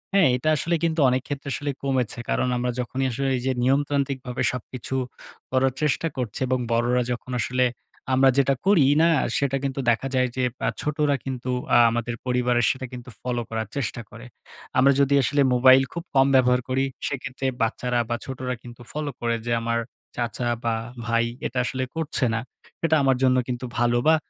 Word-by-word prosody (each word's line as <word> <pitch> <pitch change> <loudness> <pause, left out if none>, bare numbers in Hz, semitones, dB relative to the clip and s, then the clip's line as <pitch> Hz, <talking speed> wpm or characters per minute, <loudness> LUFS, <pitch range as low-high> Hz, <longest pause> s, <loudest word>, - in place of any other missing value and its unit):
হ্যাঁ, 195 -4 +6
এটা 155 +5 0
আসলে 170 +4 0
কিন্তু 165 -1 +1
অনেক 130 +1 +1
ক্ষেত্রে 140 0 -5
আসলে 145 0 -2
কমেছে। 130 -4 -1
কারণ - - +1
আমরা 125 0 -1
যখনই 130 +2 -2
আসলে 135 +3 -1
এই - - -4
যে, 130 - +2
নিয়মতান্ত্রিকভাবে 135 -1 0
সবকিছু 125 +1 -6 0.6
করার 130 0 +2
চেষ্টা 155 +3 +1
করছি, 125 -5 -3
এবং 130 0 +1
বড়োরা 120 +2 +2
যখন 125 +1 -5
আসলে 125 +1 +1 0.5
আমরা 135 +1 +5
যেটা 140 0 +4
করি 190 -8 +5 0.2
না, 165 - +5 0.3
সেটা 140 -1 +1
কিন্তু 135 0 -2
দেখা 120 +3 +1
যায় 130 0 +3
যে, 130 - 0 0.2
বা - - -1
ছোটরা 150 -1 +1
কিন্তু 130 -1 -4 0.3
আ - - +8
আমাদের 120 0 -2
পরিবারে 125 -1 +1
সেটা 130 0 -2
কিন্তু 125 0 -8
ফলো 125 -1 -2
করার 110 -1 -3
চেষ্টা 120 -3 -2
করে। 115 +2 -11 0.5
আমরা 135 +2 +6
যদি 140 0 +3
আসলে 145 +4 +2
মোবাইল 130 +1 +7
খুব 170 - -5
কম 135 0 +5
ব্যবহার 125 -1 +4
করি, 135 +1 +1 0.2
সেক্ষেত্রে 135 -1 -5 0.2
বাচ্চারা, 120 +1 0
বা 120 - 0
ছোটরা 130 -1 -4
কিন্তু 120 0 -11
ফলো 150 -1 -3
করে, 115 -1 0
যে, 120 - -2
আমার 115 0 0 0.4
চাচা 120 0 -2 0.2
বা 115 -1 +1 0.3
ভাই 115 0 +2 0.2
এটা 125 - -3
আসলে 130 +1 -2
করছে 160 -4 0
না, 115 - 0 0.5
এটা 160 -1 +3
আমার 135 -1 +3
জন্য 130 -1 +4
কিন্তু 125 0 -3
ভালো, 120 0 +3
বা 160 - +7
130 Hz, 185 wpm, -24 LUFS, 120-140 Hz, 0.6 s, আ